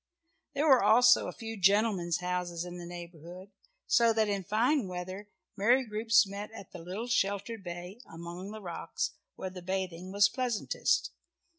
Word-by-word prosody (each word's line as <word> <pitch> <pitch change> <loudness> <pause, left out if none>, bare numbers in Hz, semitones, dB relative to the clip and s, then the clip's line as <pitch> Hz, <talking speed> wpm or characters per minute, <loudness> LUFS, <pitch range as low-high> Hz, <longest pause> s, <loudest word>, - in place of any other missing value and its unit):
There 295 +3 +1
were 265 -4 +7
also 245 +3 +6
a - - -3
few 225 -1 -7
gentlemen's 195 -3 +3
houses 180 -1 -2
in 175 0 -7
the 175 - -8
neighbourhood, 175 +2 -10 0.3
so 235 -1 +4
that 220 -1 +2
in 200 -2 -1
fine 235 - +1
weather 185 +3 -6 0.3
merry 240 +6 +3
groups 215 -1 +3
met 200 +1 -6
at 200 - -11
the 180 - -9
little 185 +7 -5
sheltered 205 -1 -1
bay 175 +5 -7
among 170 +3 -7
the 215 +1 -8
rocks, 170 -2 -3 0.2
where 190 - -5
the 185 -1 -9
bathing 185 -1 -4
was 200 0 +5
pleasantest. 245 0 0
195 Hz, 160 wpm, -30 LUFS, 180-220 Hz, 0.3 s, were